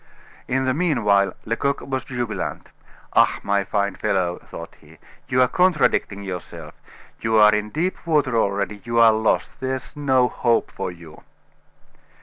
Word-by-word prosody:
In 130 +1 0
the 130 - +1
mean 155 -5 0
while, 100 -2 +3
Lecoq 140 +5 -1
was 130 -1 -4
jubilant. 120 -4 -4 0.4
"Ah, - - +4
my 100 0 +1
fine 100 0 -1
fellow," 90 -1 -1
thought - - -10
he, - - -18 0.3
"you 125 0 +3
are - - +3
contradicting 150 - +1
yourself 85 -4 -7 0.5
you 110 0 +1
are 105 0 +7
in 105 0 -1
deep 170 +6 -3
water 145 -6 +2
already 100 -1 -1
you 115 0 -3
are 115 -1 +7
lost. 110 0 0
There's 130 +1 -4
no 130 -4 +2
hope 120 -2 0
for - - -4
you." 85 -3 -14
115 Hz, 150 wpm, -22 LUFS, 100-130 Hz, 0.5 s, are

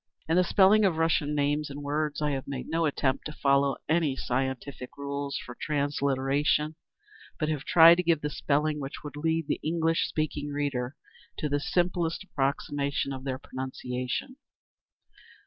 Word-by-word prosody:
In 160 - +2
the 180 - +5
spelling 200 +4 +5
of 185 -5 +2
Russian 155 -2 +1
names 145 +1 0
and 145 +1 -7
words, 150 +1 -1
I 150 - +1
have 135 -1 -3
made 135 -2 -5
no 165 0 +1
attempt 135 -2 0
to 150 - -7
follow 140 -1 +2
any 155 -4 +2
scientific 130 +1 -3
rules 140 0 -3
for 120 - -8
transliteration, 140 +1 0 0.7
but 155 - 0
have 150 -2 -2
tried 170 0 +8
to 180 - +1
give 165 -3 +2
the 150 - -2
spelling 150 +1 0
which 135 -1 -6
would 145 -1 -7
lead 160 +1 0
the - - -1
English 165 0 +1
speaking 150 -1 -2
reader 140 -2 -2 0.4
to 150 - -1
the 145 +1 +1
simplest 175 +2 0
approximation 140 -3 -1
of 130 0 -7
their 130 -1 -2
pronunciation. 130 - -4
145 Hz, 160 wpm, -28 LUFS, 140-160 Hz, 0.7 s, tried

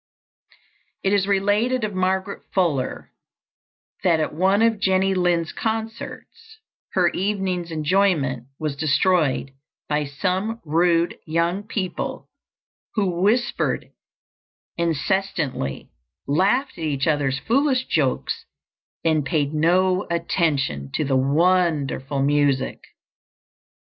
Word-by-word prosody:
It 195 - +2
is 200 -1 +2
related 205 +5 +1
of 210 -1 -2
Margaret 190 +1 -1
Fuller 160 -9 0 0.9
that 170 -4 +3
at 155 - -1
one 190 +6 +3
of 225 -2 +2
Jenny 190 -1 +2
Lind's 175 -3 +1
concerts 225 - -5 0.4
her - - +3
evening's 190 -3 -2
enjoyment 155 -6 +1
was 155 -3 -3
destroyed 150 -1 +1 0.4
by 150 0 0
some 185 +10 -2
rude 170 +2 +2
young 170 +4 0
people 200 -4 -4 0.6
who 185 -5 0
whispered 240 +6 +1 0.8
incessantly, 165 - -1 0.3
laughed 200 - +1
at - - -5
each 140 -3 -1
other's 145 -4 +1
foolish 260 - +1
jokes, 140 -5 -1 0.6
and 160 -2 +3
paid 145 +1 0
no 185 +4 +2
attention 155 - 0
to - - 0
the 135 -2 0
wonderful 145 -2 +1
music. 140 -2 +1
175 Hz, 100 wpm, -23 LUFS, 150-195 Hz, 0.9 s, that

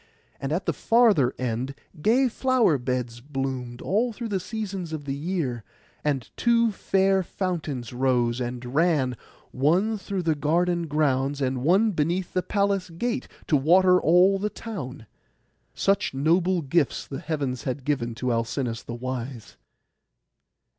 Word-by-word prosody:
And 135 +1 -3
at 170 +5 -1
the - - +1
farther 220 - +3
end 125 +2 -2 0.3
gay 245 - +4
flower 245 - +2
beds 125 -1 -3
bloomed 130 -3 -4
through - - -9
all 225 +5 +1 0.3
seasons 195 -4 -5
of 150 -2 -5
the 135 - -2
year; 140 - -2 0.4
and 135 -6 -1
two 235 -1 +3
fair 195 -1 +2
fountains 160 - -4
rose, 125 -1 +1
and 125 0 -5
ran, 150 -5 +2 0.4
one 180 +11 +2
through 195 -2 -3
the 160 -1 +2
garden 170 +3 +1
grounds, 140 -2 +1
and 130 -2 -1
one 195 - +4
beneath 175 +2 -1
the 185 - +1
palace 200 -1 0
gate, 240 +9 -3 0.2
to 155 - +2
water 180 +6 +5
all 180 +4 +5
the 210 +2 -1
town. 150 - -7 0.7
Such 195 -8 +1
noble 170 +5 +2
gifts 145 +1 +1
the 135 - -6
heavens 145 -4 -3
had 130 0 -3
given 120 -6 -1
to 125 +1 -1
Alcinous 115 0 -2
the 120 - -7
wise. 125 -1 -6
150 Hz, 140 wpm, -25 LUFS, 130-190 Hz, 0.7 s, water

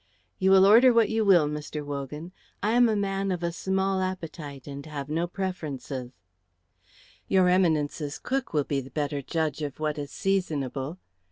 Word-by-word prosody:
"You 190 -1 +3
will 190 0 +7
order 235 +6 +7
what 230 -3 +4
you 220 0 +1
will, 180 -7 +5
Mr. 150 0 -5
Wogan. 145 +4 -5 0.3
I 210 - +2
am 240 0 +5
a 220 - +1
man 195 -1 -1
of 175 -1 -3
a 170 - 0
small 190 +2 0
appetite 165 -7 -5
and 140 -1 -7
have 145 -2 -6
no 165 +3 0
preferences." 150 -9 -4 1.2
"Your 185 -1 +4
Eminence's 155 -5 +1
cook 265 0 -2
will 150 -2 +1
be 140 0 -1
the 130 - -11
better 145 -1 -2
judge 155 +1 -2
of 145 -1 -5
what 155 -1 -1
is 145 -1 -5
seasonable. 150 -6 -2
165 Hz, 170 wpm, -27 LUFS, 145-190 Hz, 1.2 s, will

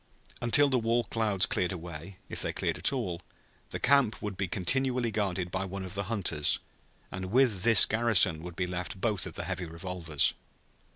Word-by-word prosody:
Until 135 +5 +5
the 130 -2 +1
war 115 +1 +1
clouds 105 -3 +1
cleared 90 -1 -1
away, 85 +1 -8
if - - -3
they - - +1
cleared - - -2
at - - +2
all, 85 -1 -3 0.5
the - - -3
camp 140 -6 +3
would 105 -2 -5
be 100 0 -2
continually 125 +6 0
guarded 95 -4 -2
by 95 +1 -2
one 95 0 -5
of 95 - -8
the 100 0 -3
hunters, 95 -9 0 0.5
and 95 0 -5
with 115 -1 +2
this 115 +1 +7
garrison 110 -8 +3
would 90 0 -8
be 90 - -1
left 90 +1 -5
both 105 -3 0
of - - -9
the - - -4
heavy 90 - -4
revolvers. 85 -2 -1
95 Hz, 185 wpm, -29 LUFS, 90-115 Hz, 0.5 s, this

